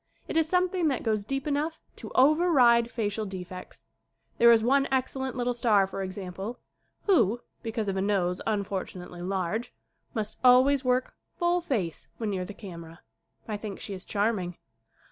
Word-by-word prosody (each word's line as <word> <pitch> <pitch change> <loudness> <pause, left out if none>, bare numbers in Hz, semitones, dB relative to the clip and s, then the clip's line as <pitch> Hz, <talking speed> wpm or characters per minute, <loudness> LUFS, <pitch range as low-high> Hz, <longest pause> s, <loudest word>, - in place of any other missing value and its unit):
It - - -5
is 325 -1 +3
something 360 -1 +2
that 270 -4 0
goes 215 -3 0
deep 270 +3 -3
enough 300 +2 -1 0.2
to - - -9
over 310 +7 +5
ride 235 -5 +5
facial 220 -2 -2
defects. 185 -2 -8 0.5
There 235 0 +8
is 225 -1 +5
one 275 +3 +3
excel 265 0 0
lent 265 -1 -3
little 245 0 0
star, 225 -5 +3
for 195 0 -5
example, 190 +4 -5 0.5
who, 240 - +3 0.2
because 225 -2 -3
of 195 - -1
a 190 - 0
nose 190 -3 0
unfortunately 190 -4 -3
large, 190 +5 -2 0.4
must 215 -1 -3
always 260 +2 +6
work 255 0 +1 0.2
full 350 +1 +1
face 210 - -2
when 220 -3 -2
near 185 -2 -2
the 205 - -9
camera. 170 -5 -10 0.5
I 215 -2 -2
think 205 -1 -7
she 200 - -6
is 185 -1 -7
charming. 200 -4 -1
220 Hz, 165 wpm, -28 LUFS, 195-260 Hz, 0.5 s, There